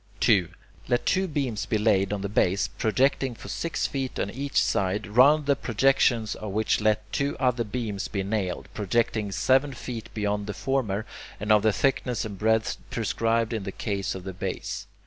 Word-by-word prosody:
2. 95 -6 +4 0.4
Let 120 -1 +1
two 190 +1 +2
beams 135 - -2
be 110 - +1
laid 105 -3 +2
on 105 -1 -2
the 100 - -2
base, 100 -1 +2
projecting 125 +5 +1
for - - -10
six 165 - -2
feet 135 -2 -3
on 100 - -1
each 140 +4 0
side, 100 +3 0
round 140 +8 +5
the 140 0 +3
projections 120 -2 +2
of 110 - -6
which 110 +1 +1
let 110 0 0
two 140 0 0
other 125 -2 +2
beams 105 -3 -3
be 100 -2 -2
nailed, 100 -3 -2
projecting 105 0 0
seven 135 +8 +2
feet 120 -3 -7
beyond 105 -1 -1
the 105 - -4
former, 115 -6 -1 0.3
and 105 +1 -1
of 105 -1 +6
the 110 - +3
thickness 130 -1 0
and 100 -3 -7
breadth 110 0 +1
prescribed 115 0 0
in 110 - -2
the 95 0 -5
case 100 -1 -3
of 95 - -7
the 95 0 -6
base. 90 - -4
110 Hz, 185 wpm, -26 LUFS, 100-125 Hz, 0.4 s, of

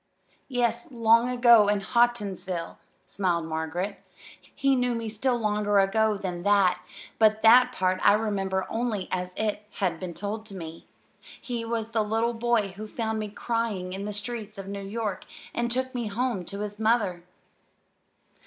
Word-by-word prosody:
"Yes, 240 -1 -1
long 230 0 +4
ago 235 -4 +6
in 205 -1 +2
Houghtonsville," 195 -7 0 0.3
smiled 175 -4 -1
Margaret. 165 +5 -3 0.4
"He 275 -1 0
knew 250 -1 +1
me 230 -1 -3
still 240 +4 0
longer 210 -2 +1
ago 210 +2 +3
than 180 -3 -4
that, 190 -2 +3 0.4
but 215 0 +4
that 250 +3 +7
part 185 -5 0
I - - +7
remember 195 -3 0
only 225 -5 -2
as 180 0 -2
it 210 -1 -2
has 175 -4 -1
been 180 -3 -6
told 210 +2 -4
to 200 - -10
me. 165 -2 -8 0.5
He 240 -2 -4
was 225 -1 -2
the 225 -1 +1
little 225 +3 0
boy 230 -3 +1
who 205 +3 -8
found 220 0 -2
me 215 -1 -3
crying 215 -4 -2
in 195 +1 -5
the 210 - -3
streets 215 0 -5
of 195 -1 -7
New 200 0 -5
York, 205 0 -4 0.3
and 235 0 -1
took 260 +2 -2
me 240 -3 -2
home 220 -3 -2
to 200 +4 -6
his 210 0 -5
mother." 215 -6 +1
210 Hz, 165 wpm, -27 LUFS, 195-230 Hz, 0.5 s, that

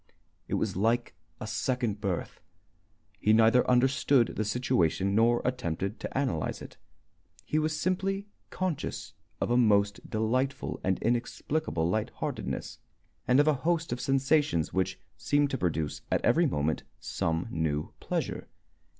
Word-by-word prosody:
It - - -1
was - - -1
like 115 +5 +1 0.3
a - - -5
second 120 -6 -1
birth. 95 -4 -3 0.8
He 105 - +3
neither 115 +3 +5
understood 130 0 +4
the 110 - 0
situation 100 -4 +1
nor 115 +3 +3
attempted 110 -5 -2
to - - -5
analyze 130 - -1
it. - - -11 0.7
He 155 - +1
was 155 0 -1
simply 195 +2 0 0.2
conscious 185 -5 -3 0.3
of - - -1
a 120 - +4
most 100 -4 +2
delightful 130 +6 -1
and 95 0 +1
inexplicable 120 - -1
light 105 +5 0
heartedness, - - -4 0.5
and 125 +2 +5
of 145 - +4
a 155 - +5
host 170 +1 0
of 120 - -4
sensations 135 - +2
which 95 -1 0 0.2
seemed 145 -1 +1
to 135 - -1
produce 80 -4 -1
at - - +1
every - - +4
moment 75 +2 0 0.2
some 80 +3 -2
new 80 -2 -1
pleasure. - - -3
120 Hz, 140 wpm, -29 LUFS, 95-135 Hz, 0.8 s, neither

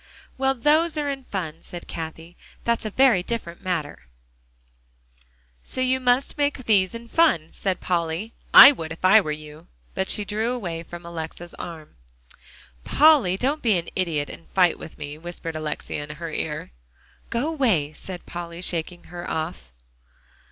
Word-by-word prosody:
"Well, 270 0 +1
those 310 +5 +2
are 290 -1 0
in 270 -1 -7
fun," 165 -7 -5
said 175 -1 -9
Cathie; 165 +1 -7 0.3
"that's 235 -1 0
a - - -1
very 245 -4 +4
different 180 -4 -4
matter" 155 - -3 1.6
"So - - -6
you 255 0 +2
must 255 +3 +1
make 285 -3 0
these 200 -1 +3
in 230 0 -8
fun," 225 - +3
said 190 -2 -2
Polly. 170 +4 -1 0.2
"I 275 - +12
would 165 - -6
if 165 +3 -4
I 215 +4 +8
were 155 - -3
you." 150 +2 -8 0.3
But 190 0 -2
she 210 - +1
drew 220 +4 -1
away 175 -9 -4
from 170 +1 -10
Alexia's 170 +1 -7
arm. 160 - -9 0.9
"Polly, 285 - +5
don't 280 +7 0
be 220 -6 +3
an 170 - -4
idiot 160 -6 0
and - - -13
fight 180 -3 +3
with 160 - -10
me," 150 0 -7
whispered 165 -1 -6
Alexia 155 -1 -4
in 150 0 -8
her 165 +1 -6
ear. 150 - -3 0.6
"Go 245 +7 -1
away," 215 - +1
said 180 +2 -9
Polly, 170 0 -6
shaking 175 0 -1
her 175 0 -6
off. 160 - -4
180 Hz, 160 wpm, -24 LUFS, 165-235 Hz, 1.6 s, I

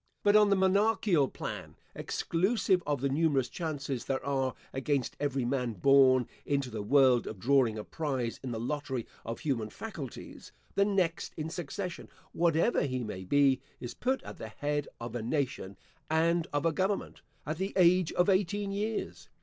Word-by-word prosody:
But 205 0 +5
on 210 -1 +6
the 200 - +4
monarchial 190 -4 +3
plan - - -6 0.2
(exclusive 190 +1 +1
of 145 -3 0
the 140 - +2
numerous 140 -3 +1
chances 145 -6 -4
there 135 -1 -2
are 135 -2 0 0.2
against 135 -1 -1
every 140 -3 -1
man 125 -2 -1
born 130 +4 +5 0.2
into 140 -3 -1
the 110 -1 -4
world, 130 +2 +4
of 110 - -6
drawing 120 0 +3
a 105 - -4
prize 130 -6 -3
in 130 - -5
the 115 -2 -3
lottery 130 -1 -3 0.2
of 115 +1 -5
human 115 -8 -1
faculties), 155 - -8 0.2
the 200 - +3
next 185 -5 0
in 160 0 -4
succession, 175 +2 -5 0.2
whatever 170 +6 +2
he 130 -3 -1
may 95 -4 -6
be, 135 +4 +3 0.2
is 120 - -6
put 260 +2 -1
at - - -9
the - - -6
head 145 +6 -2
of 120 0 -6
a 120 - -3
nation, 120 -6 -2 0.3
and 165 +1 +2
of 145 +1 -1
a 165 - +4
government, 195 +4 -1 0.2
at 155 +2 -3
the 195 +2 -1
age 180 -2 +4
of 180 - +2
eighteen 200 +1 +1
years. 210 +2 -3
145 Hz, 170 wpm, -30 LUFS, 130-180 Hz, 0.3 s, on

